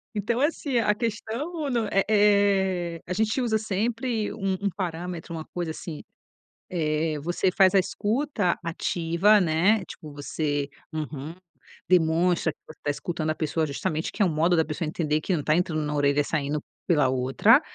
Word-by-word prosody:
Então, 225 +4 0
é 290 - +6
assim, 285 -5 -2
a 210 -2 +3
questão 235 +8 -3
não 230 -3 0
é 195 - +3
é, 195 -5 +3
a 180 - -2
gente 220 +6 +1
usa 225 -3 +1
sempre 220 +2 -1
um 195 -2 -1
um 200 - +1
parâmetro, 175 -2 -5
uma 160 -1 -4
coisa 175 -2 -4
assim, 155 -1 -7 0.6
eh, 155 -2 -1
você 175 +4 0
faz 190 0 +4
a 195 - +7
escuta 215 0 0
ativa, 170 +4 +2
né, 185 +5 +3
tipo 155 - -10
você: 145 0 -2 0.2
"Uhum", 155 0 -5 0.5
demonstra 170 -1 +3
que - - -51
você 155 - -13
tá - - -1
escutando 155 +1 -3
a 155 - 0
pessoa 155 0 -1
justamente 155 +3 -2
que 210 - +1
é - - +5
o 180 - +2
modo 165 +3 +2
da 160 - +3
pessoa 155 +1 -3
entender 155 -1 0
que 185 - 0
não 150 - -2
tá 155 - +3
entrando 165 -3 0
na 150 0 -2
orelha, 145 0 +3
saindo 150 0 -1 0.3
pela 150 -7 +4
outra. 135 - +4
175 Hz, 175 wpm, -26 LUFS, 155-210 Hz, 0.6 s, a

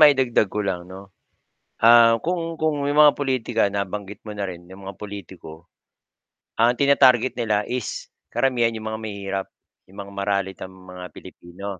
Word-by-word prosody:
maidagdag 130 -8 +5
ko 105 - -2
lang 90 -1 -4
'no, 95 0 -12 0.7
ah, 115 0 +7
kung 165 -2 -3
kung 150 -3 0
yung 145 +1 +1
mga 150 -1 +7
politika 130 -5 0
nabanggit 100 0 -4
mo 105 -1 -8
na 100 - -2
rin 90 -2 -7
yung 95 +1 -12
mga 95 0 -7
pulitiko 95 -5 -10 0.9
ang 115 +2 +5
tina-target 130 -2 +4
nila 105 -3 +1
is 125 -3 -4 0.2
karamihan 120 -3 +1
'yong 110 0 -7
mga 110 0 -5
mahihirap, 100 -2 -4 0.4
'yong 95 +2 -17
mga 100 - -12
maralitang 100 -1 -2
mga 90 -1 -11
Pilipino, 85 +3 -11
105 Hz, 155 wpm, -23 LUFS, 95-125 Hz, 0.9 s, ah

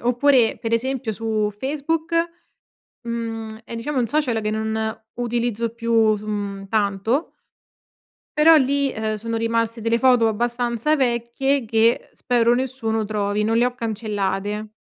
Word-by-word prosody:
Oppure 245 0 +3
per 230 -1 -3
esempio 255 0 -1
su 215 -1 -1
Facebook, 310 - -2 0.9
mhmm, 225 -2 -5
è 230 - -8
diciamo 255 +4 -2
un 235 - 0
social 255 -5 0
che 215 0 -1
non 220 0 -2 0.2
utilizzo 235 -1 -1
più 230 -2 +2
s 205 - -10
mhmm, 200 -2 -4
tanto. 215 - 0 1.0
Però 320 +2 +8
lì, 280 -1 +2
ehm, 220 0 -2
sono 230 +2 -3
rimaste 230 0 0
delle 230 +1 +1
foto 245 -3 +4
abbastanza 240 +4 0
vecchie 260 +1 0
che 225 +1 +2
spero 240 -1 +2
nessuno 240 -4 -1
trovi. 205 0 -1
Non 225 +2 +1
le 240 +1 +4
ho 250 - -3
cancellate. 210 -2 -2
230 Hz, 140 wpm, -22 LUFS, 220-245 Hz, 1.0 s, Però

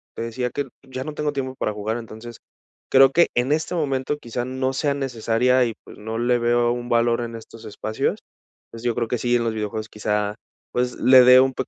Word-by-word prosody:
te 115 - -4
decía 125 +2 -3
que 145 +2 -3 0.2
ya 130 -1 -6
no 155 - -5
tengo 150 0 -1
tiempo 130 -1 -4
para 110 - -2
jugar, 110 +2 -3
entonces 115 0 -9 0.5
creo 135 0 +7
que 170 +3 +4
en 125 +3 +1
este 160 +3 0
momento 140 -3 -1
quizá 120 -3 -4
no 130 +1 -2
sea 140 +1 0
necesaria 125 -1 +1
y 115 - -3
pues, - - -14
no 110 +2 -5
le 120 +1 +2
veo 120 0 +2
un 120 0 -4
valor 120 0 +2
en 115 -1 -5
estos 115 0 -12
espacios, 110 +1 -2 0.5
pues, 115 +1 -10
yo 120 -2 0
creo 120 -1 -1
que 125 - 0
sí 120 +1 +1
en 120 - +1
los 115 -1 -1
videojuegos 110 0 -4
quizá, 105 0 -2 0.4
pues, 125 0 -1
le 130 0 +7
dé 125 +1 +8
un 130 0 +3
peq - - -4
120 Hz, 220 wpm, -23 LUFS, 115-130 Hz, 0.5 s, dé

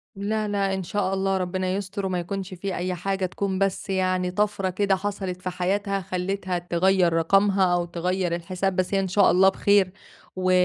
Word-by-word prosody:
لا، 215 +2 -1
لأ، 200 -1 0
إن 190 - -2
شاء 195 +1 -1
الله 195 0 +1
ربنا 185 0 -2
يستر 200 0 -4
وما 185 -2 -1
يكونش 190 +2 -5
في 190 +1 -4
أي 180 +1 -2
حاجة، 195 +1 -1
تكون 190 +1 -2
بس 195 0 -1
يعني 185 -1 0
طَفرة 205 -1 0
كده 195 +1 +1
حصَلت 190 -2 -4
في 185 - -3
حياتها 195 +2 -1
خلّتها 185 +1 -2
تغيّر 175 0 +2
رقمها، 190 +2 +3
أو 175 -1 +1
تغيّر 175 +1 -1
الحساب 185 +2 -2
بس 185 +1 -1
هي 195 - +3
إن 195 - 0
شاء 200 +2 +4
الله 190 +2 +6
بخير 200 -1 +3 0.4
و 185 0 +1
190 Hz, 185 wpm, -25 LUFS, 180-195 Hz, 0.4 s, الله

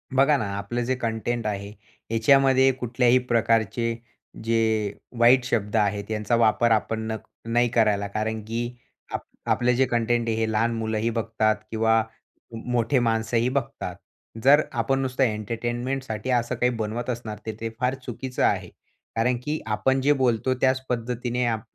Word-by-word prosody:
बघा 140 +2 +5
ना, 110 - -2
आपलं 120 +5 -3
जे 130 +1 0
कंटेंट 115 0 -2
आहे 100 -1 -3 0.4
याच्यामध्ये 135 +3 +5
कुठल्याही 125 +1 +3
प्रकारचे 115 0 +1 0.5
जे 110 -2 +1 0.3
वाईट 125 +2 +6
शब्द 105 -3 -1
आहेत 105 0 0
यांचा 105 +2 0
वापर 115 0 +3
आपण 110 0 +1
न - - -1 0.4
नाही 120 0 +3
करायला 105 -4 +2
कारण 110 +2 -2
की 115 +1 -2 0.5
आप - - -2 0.3
आपले 125 0 +2
जे 130 +2 +3
कंटेंट 120 -1 0
आहे 115 - +1
हे 110 -1 0
लहान 115 +2 +1
मुलंही 110 0 -1
बघतात 110 -1 0 0.2
किंवा 110 0 +3 0.5
म 115 - -6
मोठे 120 +2 +2
माणसंही 115 +1 +1
बघतात. 135 -2 -3 0.5
जर 145 +3 +7
आपण 135 +2 0
नुसतं 130 0 0
एंटरटेनमेंटसाठी 120 +2 -2
असं 120 0 +1
काही 125 +1 +2
बनवत 115 +3 -3
असणार 115 -3 -4
तर 110 - -2
ते 115 0 -3
फार 125 +1 +1
चुकीचं 125 +1 -3
आहे. - - +1 0.5
कारण 120 +2 +1
की 150 +2 -2
आपण 130 +5 +1
जे 145 +2 +4
बोलतो 125 +1 +2
त्याच 130 0 +3
पद्धतीने 120 +1 -1
आप 110 -2 0
115 Hz, 155 wpm, -25 LUFS, 110-125 Hz, 0.5 s, जर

